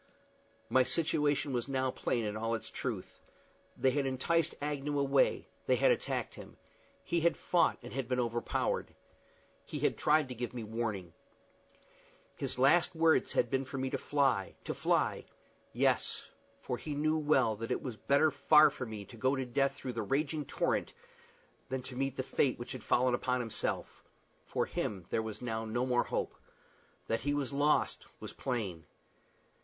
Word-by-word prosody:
My 130 - +4
situation 145 0 +1
was 120 0 -1
now 130 -1 0
plain 120 -2 -1
in 105 0 -2
all 115 +1 -1
its 110 - -7
truth. - - -5 0.6
They 130 - +3
had 140 0 0
enticed 160 +5 +1
Agnew 145 0 -2
away; 140 -1 +2 0.2
they - - +4
had - - +4
attacked 485 - -1
him. - - -11 0.5
He 170 - 0
had 170 +1 +3
fought, 175 - +2
and 120 - -8
had 135 -2 -2
been 125 0 0
overpowered. 120 -1 -1 0.7
He - - -6
had - - +1
tried 150 -1 +3
to - - -4
give 120 +1 -5
me 120 - -4
warning. 105 -6 -3 1.2
His 130 -2 -4
last 155 +7 +4
words 160 0 +3
had - - +1
been 135 0 +1
for 135 +1 -6
me 130 0 -2
to - - 0
fly 135 -9 +1
to - - -3
fly: - - +1 0.5
yes, - - +1 0.4
for - - -3
he 150 -2 -4
well 155 -5 +2
knew - - -20
that 115 - -4
it - - -1
was 125 -4 -4
better 145 +7 +3
far 150 +2 +6
for 130 -3 -5
me 105 -2 -6
to 120 - -13
go 130 +4 +1
to 130 -1 -2
death 135 +3 +1
through 130 -2 -5
the 115 - -2
raging 145 +7 -1
torrent - - -1 0.8
than 130 -1 -3
to 130 0 -6
meet 135 0 -2
the 130 - -1
fate 130 0 +1
which 120 - -7
had 130 -4 -7
fallen 125 0 +3
upon 125 +1 0
himself. 115 -3 -3 0.4
For - - 0
him 95 -5 -3
there 110 - +1
was 110 +2 -6
now 110 -2 -2
no 115 +3 -1
more 125 -1 +2
hope. - - -2 0.7
That 115 - 0
he 145 +1 0
was 140 -1 -2
lost 145 +2 +1
was - - -8
plain. 100 - -3
130 Hz, 175 wpm, -32 LUFS, 120-145 Hz, 1.2 s, far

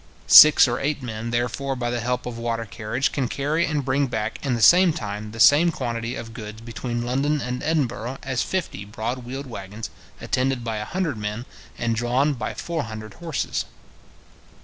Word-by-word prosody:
Six 155 -2 +9
or 120 0 -1
eight 140 -1 -2
men, 115 -1 -5
therefore, 125 +3 -1
by 120 -1 -2
the 120 - -1
help 125 +2 -2
of 120 -1 -6
water 115 -1 -2
carriage, 115 +5 -2
can 135 -3 -1
carry 150 +7 0
and 150 -3 -1
bring 135 +1 +1
back, 110 -2 -4
in 135 -4 0
the 115 - -3
same 180 - +7
time, 105 -6 -5
the 115 - -9
same 145 +7 +6
quantity 115 -4 -3
of 115 -1 -7
goods 110 -1 -8
between 120 +1 -4
London 140 +5 0
and 125 0 -4
Edinburgh 130 -5 -1
as 130 -2 -1
fifty 185 - -3
broad 110 +5 -4
wheeled 130 +3 -6
waggons, 110 -3 -7 0.3
attended 130 -1 -1
by 115 -2 -3
a 105 - -4
hundred 170 - -2
men, 105 +3 -4 0.3
and 115 -1 -1
drawn 125 +5 +1
by 120 -5 -5
four 165 -5 -3
hundred 110 -1 -8
horses. 165 -3 -3
120 Hz, 185 wpm, -23 LUFS, 115-140 Hz, 0.3 s, Six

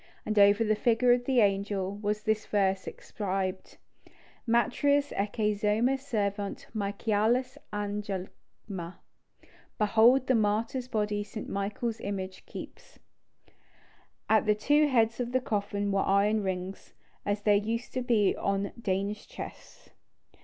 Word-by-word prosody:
And 215 -1 +1
over 205 +2 +6
the 215 -1 +2
figure 235 +3 +3
of 245 0 0
the 255 -2 +3
angel 200 -1 0
was 210 0 -2
this 220 -1 0
verse 195 -2 +1
inscribed:— 190 -2 -4 0.7
"Martiris 280 +5 +2
ecce 210 +1 0
zoma 215 +5 +2
servat 205 -7 -3
Michaelis 220 +5 0
agalma." 200 -3 -6 0.8
("Behold 230 +5 +5
the 260 - +2
martyr's 225 +3 0
body 210 -3 -1
St. 210 +1 -7
Michael's 215 +3 -3
image 190 -2 -5
keeps.") - - -10 1.3
At 220 -1 +3
the 210 - +4
two 295 +8 +3
heads 230 -4 +2
of 245 0 -3
the 255 - +4
coffin 205 -3 -2
were 195 0 +2
iron 205 +2 +2
rings, 190 0 -5 0.3
as 205 0 -2
there 210 - +4
used 225 +4 -1
to 255 - -1
be 230 -5 +2
on 200 0 -1
Danish 200 +1 -2
chests. - - -10
210 Hz, 125 wpm, -29 LUFS, 200-230 Hz, 1.3 s, over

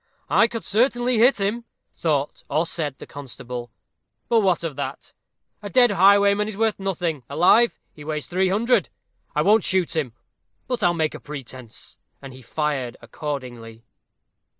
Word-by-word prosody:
"I 230 - +5
could 230 -1 -6
certainly 240 +2 +2
hit 245 +1 +5
him," 210 +4 -1 0.3
thought, 150 -3 -1
or 160 - +1
said, 150 -5 -3
the - - -10
constable; 125 -3 -7 0.6
"but 230 - +4
what 185 -5 +2
of 160 -4 -3
that? 140 - -6 0.5
A 205 - -6
dead 245 +1 +5
highwayman 200 +2 +5
is 215 -2 -6
worth 220 -1 +1
nothing 175 -6 -2
alive, 180 +11 +4
he 150 - -12
weighs 150 -1 -4
300_l_. 190 +7 +2 0.5
I - - +3
won't 210 0 +4
shoot 185 -3 +1
him, 140 -8 -1 0.5
but 250 -2 -2
I'll 175 -1 +3
make 160 -2 0
a - - -8
pretence." 130 -5 -9 0.2
And 135 -1 -10
he 130 - -12
fired 135 -1 -2
accordingly. 120 -4 -7
170 Hz, 150 wpm, -23 LUFS, 140-210 Hz, 0.6 s, I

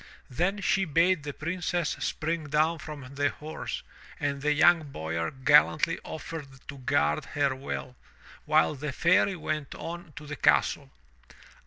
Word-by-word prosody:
Then 180 +9 0
she 195 -1 +2
bade 170 +1 +3
the 145 0 -5
Princess 175 +1 -2
spring 160 +4 -2
down 155 +3 +2
from 150 -4 -8
the 145 +1 +1
horse, 155 +1 -6 0.4
and 140 -1 -1
the 150 +1 +2
young 155 0 +4
Boyar 80 -3 -2
gallantly 100 - +4
offered 160 -2 -6 0.2
to 140 - -7
guard 145 +3 +1
her 140 -2 0
well, 130 -1 -5 0.5
while 80 - +3
the 150 +1 -4
Fairy 180 +6 +3
went 155 -3 -4
on 170 -1 -7
to 150 - -9
the 150 0 -5
castle. 70 - +2
150 Hz, 145 wpm, -28 LUFS, 140-165 Hz, 0.5 s, young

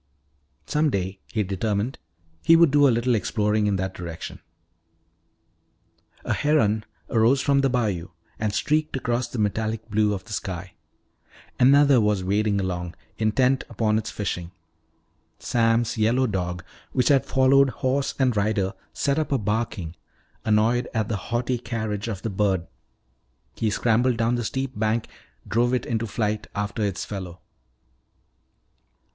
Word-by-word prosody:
Some 150 0 +1
day, 95 -4 -2
he 110 -2 0
determined, 100 +5 -2 0.4
he 165 - +6
would 165 -3 +6
do 145 0 +5
a - - +4
little 120 +1 +2
exploring 105 -1 +1
in 100 - +1
that 95 0 -2
direction. 85 -2 -7 1.9
A - - +1
heron 110 -8 +2 0.3
arose 115 +4 +4
from 140 +1 +2
the 135 - +2
bayou 105 -9 -1 0.3
and 110 -1 0
streaked 150 +9 0
across 120 -1 -1
the 120 - -7
metallic 110 +1 -1
blue 105 0 +2
of 95 - -7
the 115 - -9
sky. 95 -3 -5 0.9
Another 140 0 +6
was 105 -3 +1
wading 100 +2 +1
along, 90 -3 -3 0.2
intent 125 +4 +2
upon 110 -1 +1
its 110 - -5
fishing. 90 -4 -4 0.9
Sam's 115 -1 +1
yellow 120 +4 +3
dog, 90 -5 -2 0.3
which 125 - +2
had 140 -3 +5
followed 135 +1 +4
horse 135 +2 -1
and 130 -4 +2
rider, 100 -2 0 0.2
set 140 +1 0
up 155 - -2
a 135 - +3
barking, 105 -6 -2 0.5
annoyed 110 +3 +2
at 110 -1 0
the 110 - 0
haughty 120 +1 0
carriage 110 -3 -3
of 100 -5 -5
the 115 - -1
bird. 95 -3 +1 0.9
He 110 - 0
scrambled 120 +3 +2
down 115 +1 +1
the 120 -1 -1
steep 130 +3 -2
bank, 110 +1 0 0.4
drove 120 +2 +2
it 125 - -2
into 115 -1 -1
flight 105 0 -2
after 105 +2 -2
its 100 -3 -2
fellow. 95 -3 -7
110 Hz, 145 wpm, -24 LUFS, 100-125 Hz, 1.9 s, he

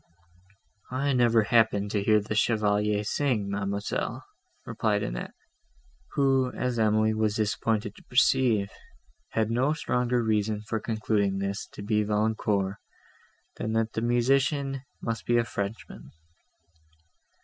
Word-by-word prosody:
"I 135 +2 0
never 120 -3 +4
happened 105 -3 +2
to 105 - 0
hear 105 +1 +4
the 105 +1 -4
Chevalier 105 -1 +1
sing, 105 -4 0
Mademoiselle," 100 0 -3 0.4
replied - - 0
Annette, - - -5 0.8
who, 135 -2 +2
as 125 -2 -2
Emily 110 0 +3
was 110 -1 0
disappointed 110 -1 -1
to - - -16
perceive, 125 -6 +3 0.6
had 110 0 +1
no 130 +6 +2
stronger 125 -5 0
reason 105 -1 0
for 110 +1 -2
concluding 105 -3 0
this 100 +1 -3
to 100 - -8
be 105 0 +1
Valancourt, 105 -2 0 0.8
than 110 - -3
that 115 0 0
the 110 - -2
musician 135 +3 +1 0.2
must 115 -1 -3
be 120 - +3
a 120 - +3
Frenchman. 100 -1 -6
110 Hz, 125 wpm, -27 LUFS, 105-120 Hz, 0.8 s, never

